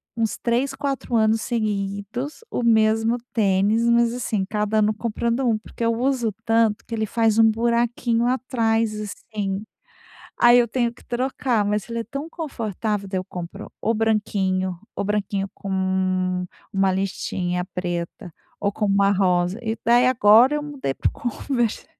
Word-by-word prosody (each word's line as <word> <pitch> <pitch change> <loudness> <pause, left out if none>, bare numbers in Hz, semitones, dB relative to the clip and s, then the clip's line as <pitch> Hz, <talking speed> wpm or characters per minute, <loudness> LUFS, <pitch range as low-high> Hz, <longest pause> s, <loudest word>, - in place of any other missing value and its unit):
uns 225 -2 -1
3, 245 +3 0
4 275 -4 -2
anos 220 0 +3
seguidos, 215 - -3
o - - -1
mesmo 225 0 +3 0.2
tênis, 210 +2 +2
mas 235 0 +3
assim, 220 -5 -1
cada 210 +1 -1
ano 215 0 +3
comprando 235 +2 -2
um, 230 -3 +2
porque 225 +2 -8
eu 230 - +3
uso 240 -1 0
tanto 225 -2 +2
que 230 - -8
ele 220 -1 -1
faz 225 0 +2
um 225 0 +7
buraquinho 235 +1 +1
atrás, 230 -3 +1
assim. 205 -1 -4 0.8
Aí 240 0 +7
eu 240 - +4
tenho 235 0 0
que - - -19
trocar. 245 -3 0
Mas 210 +2 -1
ele 230 0 -3
é - - -2
tão 275 +7 -6
confortável. 220 - -3
Daí 190 - -2
eu 185 - -6
compro 180 +4 -7
o 225 - +1
branquinho, 195 -4 0 0.2
o - - -2
branquinho 200 -1 -1
com 195 - -8
um 185 -1 0 0.3
uma 195 -1 +2
listinha 180 -2 -2
preta, 175 +1 -4 0.2
ou 200 - 0
com 210 - -2
uma 200 0 +3
rosa, 185 +1 +1
e 225 -2 -2
daí 240 +2 +5
agora 240 +3 +6
eu 295 - -2
mudei 280 - -4
para - - 0
o - - -12
Converse. 240 -1 -2
220 Hz, 160 wpm, -23 LUFS, 200-235 Hz, 0.8 s, um